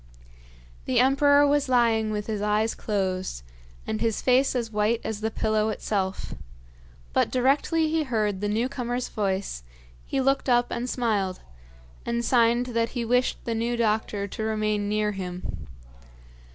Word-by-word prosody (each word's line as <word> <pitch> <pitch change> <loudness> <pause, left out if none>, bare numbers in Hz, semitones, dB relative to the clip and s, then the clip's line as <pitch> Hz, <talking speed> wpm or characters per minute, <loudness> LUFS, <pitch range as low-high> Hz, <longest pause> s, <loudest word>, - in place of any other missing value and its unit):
The - - +2
emperor 285 +3 +5
was 285 -1 +2
lying 230 -3 +3
with 210 -1 -3
his 215 -2 -3
eyes 210 +2 +1
closed, 190 - -2 0.4
and 215 - -3
his 225 -2 0
face 260 +1 +3
as 235 -3 -2
white 215 +2 +1
as 220 -1 -4
the 220 - 0
pillow 215 0 0
itself; 195 -3 -2 0.8
but - - +2
directly 280 +5 +2
he 320 +1 +1
heard 215 -8 -1
the 205 - -1
new 225 +4 +1
comer's 250 -2 -3
voice, 195 - -2 0.4
he 275 - -2
looked 270 0 +1
up 240 -1 +3
and 245 +2 -3
smiled, 205 -7 -1 0.6
and 235 0 -2
signed 240 0 +3
that 230 0 +1
he 235 - -1
wished 250 +2 +1
the 230 - -1
new 235 +2 -1
doctor 215 -2 0
to 220 - -7
remain 215 -1 0
near 210 0 +1
him. 180 - -6
225 Hz, 150 wpm, -26 LUFS, 210-245 Hz, 0.8 s, emperor